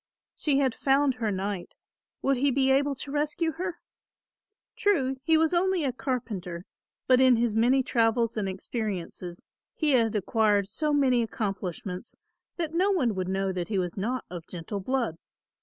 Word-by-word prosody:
She 290 -3 +1
had 265 -3 +2
found 275 +3 +2
her 235 -3 -2
knight; 195 -1 -3 0.5
would 275 -1 +2
he 280 +3 +2
be 265 0 +2
able 280 +1 +2
to 275 +1 -7
rescue 300 +3 0
her? 350 +3 -4 1.0
True, 270 -10 +1
he 320 -1 +4
was 320 +1 +2
only 365 -1 +2
a 265 -3 0
carpenter, 205 -10 -4 0.4
but 255 0 +5
in 260 -1 +6
his 235 -1 +1
many 245 +4 +3
travels 230 -1 +1
and 205 -3 -1
experiences 190 -3 -5 0.3
he 310 -2 +1
had 230 -4 +3
acquired 210 -1 +2
so 300 +9 -1
many 265 -4 +3
accomplishments 195 -3 -4 0.4
that 330 -2 -2
no 370 +4 +3
one 280 - +2
would 185 -2 -3
know 190 0 0
that 180 -2 -3
he 210 - -1
was 180 -2 -1
not 235 +6 -2
of 175 -2 -7
gentle 180 +4 -5
blood. 230 -6 -1
240 Hz, 165 wpm, -27 LUFS, 195-280 Hz, 1.0 s, in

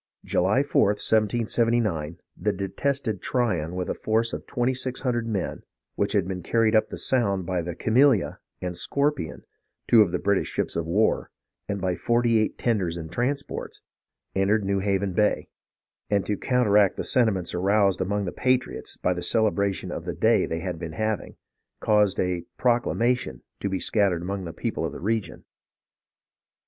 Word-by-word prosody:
July 100 +10 +2
4th, 105 -7 +2
1779, 110 -7 +1 0.2
the 105 - 0
detested 110 +3 -2
Tryon 90 -10 0
with 90 -1 -2
a - - -1
force 115 +2 0
of - - -6
twenty 125 0 0
six 130 0 -2
hundred 120 -3 -1
men, 100 -5 -3 0.3
which 100 - -1
had 100 -4 +2
been 95 -1 -4
carried 115 +4 +2
up 110 - +4
the - - -6
Sound 100 -8 +1
by 90 -1 -1
the 85 0 -5
Camilla 120 -2 +3 0.2
and 90 -1 -3
Scorpion, 140 - -1 0.4
two 115 - +7
of 100 -5 +3
the - - 0
British 100 -1 +1
ships - - -2
of 85 -1 -2
war, 105 +6 +1 0.4
and 100 -1 -2
by 95 -1 0
forty 120 0 +2
eight 110 - -1
tenders 95 -8 0
and 80 -1 -7
transports, 135 +8 -3 0.5
entered 100 +2 +2
New 100 0 +1
Haven 95 -1 0
Bay; 105 +3 +1 0.6
and 100 -2 +1
to 105 - 0
counteract 105 -5 +3
the - - -2
sentiments 105 -8 +1
aroused 100 +1 +2
among 100 +2 -1
the 90 - -3
patriots 130 0 -1
by 90 - +1
the 90 - -5
celebration 100 -2 +1
of - - -5
the - - -3
day - - +3
they 80 0 -3
had 90 -3 -4
been 80 -2 -6
having, 110 +3 -2 0.4
caused 105 -2 +2
a 90 -1 0 0.2
"proclamation" 120 - +1 0.2
to 100 - -2
be 95 -1 -1
scattered 95 -6 +1
among 95 +1 -3
the 85 - -5
people 80 - -3
of - - -2
the - - -7
region. 110 +3 -2
100 Hz, 170 wpm, -25 LUFS, 90-115 Hz, 0.6 s, two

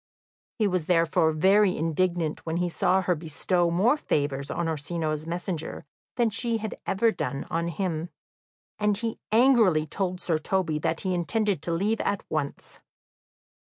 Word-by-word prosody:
He 215 -3 +2
was 185 -4 -1
therefore 165 -1 +3
very 190 +4 +4
indignant 165 0 0
when 165 0 -2
he 175 0 0
saw 185 +2 +2
her 180 - +2
bestow 170 +2 0
more 205 - +3
favours 140 - -1
on 170 -1 -2
Orsino's 155 0 -2
messenger 170 -3 -4 0.3
than 235 -3 +2
she 230 +2 0
had 220 -1 -5
ever 225 +4 +3
done 140 -9 -3
on 170 0 0
him, 170 -2 -2 0.7
and 210 -1 +2
he 225 +1 -4
angrily 220 -9 +5
told 180 +3 -3
Sir 165 -3 0
Toby 165 -2 0
that 160 +1 -1
he 190 -1 -1
intended 200 0 0
to 170 - -3
leave 205 +7 0
at 200 -1 -1
once. 145 -2 -4
175 Hz, 155 wpm, -26 LUFS, 160-200 Hz, 0.7 s, angrily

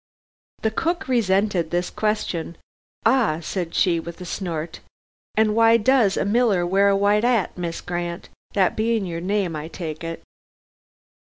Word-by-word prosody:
The 220 - +2
cook 340 - -1
resented 195 -7 +1
this 175 +1 -1
question. 180 -6 -2 0.5
"Ah!" 225 -10 +3
said 170 0 -4
she 170 -3 +3
with 170 0 -8
a 180 - -7
snort, 170 -3 -4 0.6
"and 215 -1 +3
why 230 0 +6
does 230 -3 +3
a - - 0
miller 205 -4 +2
wear 195 +3 +3
a 200 - +3
white 205 +2 +3
'at, 235 -7 +1
Miss 170 -2 -4
Grant, 175 -1 -4 0.3
that 190 -3 +2
being 225 -1 0
your 170 -2 -4
name 190 -2 -1
I 155 +1 -5
take 160 -2 -6
it. 165 0 -6
190 Hz, 155 wpm, -23 LUFS, 170-220 Hz, 0.6 s, why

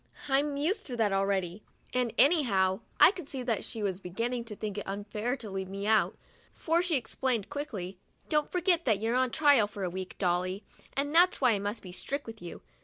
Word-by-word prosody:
I'm 280 +1 +1
used 380 +9 -1
to 250 -3 -5
that 220 -3 +2
al 195 0 +1
ready, 190 -1 -1 0.3
and 250 -2 +1
anyhow, 210 - +4 0.2
I - - +9
could 360 -7 -9
see 265 -2 -4
that 235 -3 -1
she 220 - -5
was 190 -2 -1
beginning 230 +6 -3
to 215 -2 -7
think 210 -1 -4
it - - -8
unfair 210 +5 -3
to 230 - -7
leave 190 -1 -4
me 195 +1 -5
out, 220 +1 +2 0.4
for 330 +1 +1
she 350 -3 +1
explained 240 -4 -1
quickly, 195 -11 -5
" - - -38
Don't 300 -1 +1
forget 355 -1 +2
that 220 -6 +2
you're 225 +2 -1
on 255 0 +2
trial 280 -5 +4
for 205 -1 -7
a 180 - -2
week, 185 0 -6
Dolly, 185 +2 0 0.3
and 285 +2 0
that's 350 +2 +5
why 255 -3 +4
I 205 - +1
must 205 +3 -4
be 185 - -9
strict 280 +10 -4
with 225 -3 -9
you. 175 - -9
225 Hz, 220 wpm, -30 LUFS, 195-280 Hz, 0.4 s, I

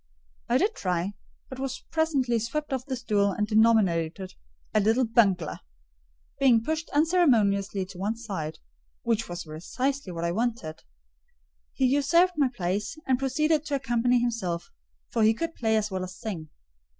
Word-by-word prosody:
I 240 - +4
did 410 +9 +1
try, 180 - -2 0.3
but 260 - -9
was 265 -1 -4
presently 280 -7 +1
swept 275 +6 -3
off 260 0 -3
the 265 - -2
stool 210 -5 +1
and 210 - 0
denominated 195 -5 +2 0.4
"a 215 - +4
little 225 +5 +3
bungler." 195 -8 +2 0.8
Being 245 -5 +5
pushed 315 +4 -2
unceremoniously 225 - +2
to 185 -1 -12
one 205 +4 -1
side—which 205 +3 -5
was 175 0 -5
precisely 230 - -3
what 170 -1 -5
I 170 - 0
wished—he 65 - -5
usurped 290 +7 +3
my 285 -3 +3
place, 205 - -3
and 260 -1 +2
proceeded 300 +3 +1
to 290 - -1
accompany 245 -2 +2
himself: 220 -8 -2 0.4
for 230 - 0
he 220 +1 +5
could 330 +6 -3
play 220 -5 0
as 215 -1 -1
well 185 -1 -2
as 185 0 -7
sing. 170 -8 -5
225 Hz, 150 wpm, -27 LUFS, 185-265 Hz, 0.8 s, Being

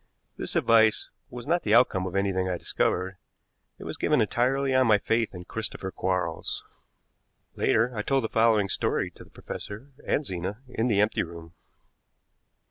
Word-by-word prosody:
This - - -5
advice 110 -1 +4 0.2
was 120 -1 -8
not 175 +2 +2
the - - +3
outcome 95 -7 +4
of 90 - -6
anything 95 -1 +1
I 90 - -1
discovered; 90 +2 -1 0.6
it - - -10
was - - -6
given 150 -2 +2
entirely 130 +5 +1
on 130 -1 +4
my 110 -2 +6
faith 115 0 0
in 90 0 -8
Christopher 105 -3 -5
Quarles. 90 -3 -2 0.9
Later 115 +2 +2
I 105 - -1
told 135 +4 +1
the - - 0
following 110 -3 +3
story - - -1
to - - -14
the - - -19
professor 110 +8 -8
and 150 - 0
Zena 95 +1 -4
in 120 -1 -1
the 105 -4 +2
empty 105 +1 +1
room. 85 0 -8
110 Hz, 165 wpm, -27 LUFS, 95-120 Hz, 0.9 s, my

